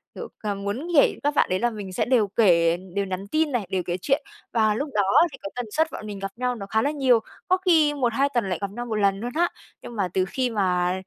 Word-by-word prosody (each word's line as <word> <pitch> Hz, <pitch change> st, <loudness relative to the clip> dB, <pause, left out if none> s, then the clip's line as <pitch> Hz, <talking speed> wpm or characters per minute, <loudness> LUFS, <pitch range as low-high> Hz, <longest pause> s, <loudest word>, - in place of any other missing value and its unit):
kiểu, -, -, -6 dB
cà 210 Hz, -2 st, -2 dB
muốn 200 Hz, -, -4 dB
kể 285 Hz, -, +5 dB
các 290 Hz, +1 st, +1 dB
bạn -, -, +3 dB
đấy 185 Hz, -, 0 dB
là 240 Hz, -, +2 dB
mình 205 Hz, -4 st, -7 dB
sẽ -, -, 0 dB
đều 240 Hz, -5 st, +3 dB
kể 170 Hz, -5 st, +3 dB, 0.2 s
đều 200 Hz, 0 st, 0 dB
nhắn 190 Hz, +1 st, -5 dB
tin 310 Hz, +6 st, +1 dB
này, 240 Hz, -6 st, -1 dB
đều 185 Hz, -1 st, -1 dB
kể 175 Hz, 0 st, -2 dB
chuyện 280 Hz, +5 st, +1 dB, 0.3 s
và 220 Hz, -2 st, +3 dB
lúc 285 Hz, +6 st, -3 dB
đó 210 Hz, -, +3 dB, 0.3 s
thì 270 Hz, -, -10 dB
cái 295 Hz, -, -5 dB
tần 245 Hz, -, -3 dB
suất 320 Hz, +5 st, +2 dB
bọn 215 Hz, -, -7 dB
mình 205 Hz, -2 st, -6 dB
gặp 195 Hz, 0 st, -4 dB
nhau 250 Hz, 0 st, -1 dB
nó 200 Hz, -, -7 dB
khá 220 Hz, +2 st, +1 dB
là 285 Hz, -, +1 dB
nhiều, 265 Hz, -5 st, +3 dB, 0.3 s
có 370 Hz, -, +4 dB
khi 315 Hz, -5 st, +4 dB
1-2 270 Hz, 0 st, +1 dB
tuần 235 Hz, -6 st, 0 dB
lại 180 Hz, -, -1 dB
gặp 200 Hz, -1 st, -3 dB
nhau 240 Hz, +4 st, -5 dB
1 225 Hz, -2 st, -3 dB
lần 200 Hz, -2 st, +2 dB
luôn 240 Hz, +3 st, -4 dB
á. 345 Hz, +2 st, +3 dB, 0.3 s
Nhưng 240 Hz, -, -9 dB
mà 200 Hz, -4 st, 0 dB
từ 185 Hz, -1 st, +2 dB
khi 250 Hz, +6 st, -1 dB
mà, 180 Hz, -5 st, +1 dB
220 Hz, 270 wpm, -24 LUFS, 195-270 Hz, 0.3 s, kể